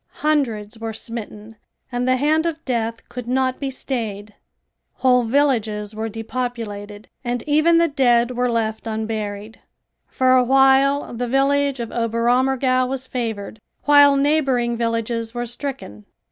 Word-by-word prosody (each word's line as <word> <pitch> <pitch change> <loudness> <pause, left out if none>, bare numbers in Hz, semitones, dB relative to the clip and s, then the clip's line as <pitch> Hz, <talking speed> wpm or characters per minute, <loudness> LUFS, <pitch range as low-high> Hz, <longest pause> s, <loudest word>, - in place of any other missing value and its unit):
Hundreds 230 -8 0
were 225 0 -4
smitten 220 -1 -7 0.3
and 245 +1 -1
the 255 - +4
hand 310 +4 +2
of 325 -1 -5
death 230 -3 -2
could 245 -1 -8
not 255 +1 0
be 275 - -2
stayed. 215 -6 -4 0.6
Whole 250 -1 +3
villages 225 -5 0
were 220 +1 -4
depopulated 220 -3 -5 0.2
and 245 -1 -2
even 310 +3 +4
the 335 0 +4
dead 245 -5 +2
were 250 0 0
left 220 -1 -2
unburied. 215 -1 -4 0.5
For 255 0 +3
a 255 - +5
while 270 +2 +3
the 245 +1 -3
village 275 +1 +1
of 235 -1 -5
Oberammergau 250 +3 +1
was 260 0 -4
favored, 225 -4 -4 0.2
while 285 -1 +6
neighboring 275 -5 +1
villages 230 0 -2
were 240 0 -2
stricken. 240 - -6
245 Hz, 135 wpm, -21 LUFS, 225-270 Hz, 0.6 s, while